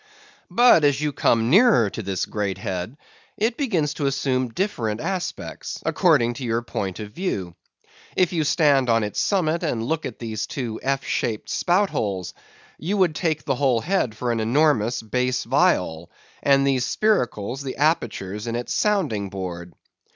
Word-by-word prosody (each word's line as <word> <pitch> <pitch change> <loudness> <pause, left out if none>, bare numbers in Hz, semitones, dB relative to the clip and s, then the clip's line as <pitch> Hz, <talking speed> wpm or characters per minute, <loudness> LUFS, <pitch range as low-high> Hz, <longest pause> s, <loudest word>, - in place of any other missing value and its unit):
But 240 -10 +5
as 145 -1 +3
you 150 -1 -1
come 115 -1 +2
nearer 200 - +6
to - - -5
this 95 -2 -2
great 100 -3 -3
head 95 +8 -4 0.4
it 225 +2 0
begins 180 - 0
to 140 -1 -1
assume 130 -2 0
different 115 - -2
aspects, 185 +3 -4
according 145 -10 +3
to 130 - -7
your 115 -1 -1
point 95 -4 -4
of 105 -1 -7
view. 100 - -3 0.6
If 180 -1 +2
you 165 -2 +1
stand 145 -4 +3
on 115 -1 +3
its 105 - -3
summit 170 -4 +1
and 125 -9 -1
look 160 +6 -1
at 120 - -9
these 110 -2 -4
two 120 -6 -4
F 135 0 -1
shaped 110 -3 -2
spoutholes, 110 - 0 0.5
you 195 +6 -1
would 185 -5 +3
take 155 -1 -1
the 135 - +1
whole 130 -3 +1
head 140 - -1
for 120 +1 -1
an 115 - -1
enormous 120 -1 +2
bass 125 +3 -1
viol, 115 - +1 0.3
and 140 -1 +4
these 135 -2 +2
spiracles, 130 - 0
the 135 -2 -5
apertures 110 - -1
in 115 - -2
its 120 0 -3
sounding 150 - 0
board. 90 -2 -6
130 Hz, 165 wpm, -23 LUFS, 110-160 Hz, 0.6 s, nearer